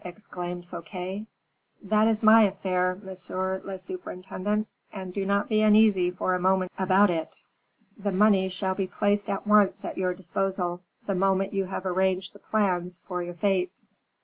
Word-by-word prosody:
exclaimed 180 -2 -7
Fouquet. 185 +4 -6 0.6
"That 215 +2 +3
is 225 0 0
my 220 +1 +8
affair, 185 -2 0
monsieur 190 0 -3
le 195 -1 -6
surintendant; 205 - -4 0.3
and 190 -2 -7
do 200 - -2
not 200 +1 +1
be 215 -1 +2
uneasy 210 -4 +5
for 180 +1 -1
a 180 - 0
moment 185 0 +2
about 190 +1 +4
it. 160 -2 -4 0.6
The 200 0 -1
money 195 -1 +4
shall 190 +1 -2
be 190 0 -2
placed 205 +1 0
at 195 0 -2
once 210 -2 +4
at - - -5
your 180 -1 0
disposal, 180 -1 -2 0.2
the 200 - -1
moment 195 +1 +1
you 195 -1 0
have 185 0 -5
arranged 185 0 0
the 205 - -15
plans 180 -5 -1
of 180 -2 -3
your 175 0 -7
fete." 185 0 +1
190 Hz, 165 wpm, -27 LUFS, 180-205 Hz, 0.6 s, my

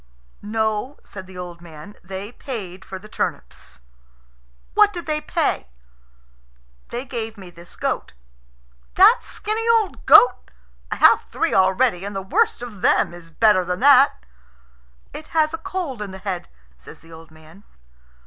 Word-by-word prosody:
"No," 220 +5 -2
said 190 -2 -10
the 185 -1 -12
old 175 -1 -8
man; 165 +3 -12
"they 190 +3 -7
paid 195 -9 -7
for 190 - -8
the 200 +3 -13
turnips." 65 - -6 0.9
"What 420 -1 +5
did 345 -4 -7
they 305 -1 -2
pay?" 305 - -1 1.2
"They 245 +3 -5
gave 225 -4 -5
me 185 -3 -11
this 170 0 -15
goat." - - -3 0.8
"That 415 +6 +7
skinny 440 +2 -3
old 450 -4 +1
goat! 250 0 +6 0.4
I - - -2
have - - +5
three - - -1
already, 190 +1 +2
and 200 0 -6
the 195 - -3
worst 440 - 0
of 215 -6 -9
them - - +2
is 175 -1 -13
better 185 +2 +3
than 180 0 -3
that." 275 - +5 0.9
"It 310 - -9
has 310 0 +3
a 330 - -4
cold 325 - -5
in 210 - -5
the 190 - -9
head," 190 -2 -5 0.3
says 60 - -14
the 165 +1 -16
old 160 0 -13
man. 160 +5 -18
210 Hz, 155 wpm, -21 LUFS, 180-285 Hz, 1.2 s, That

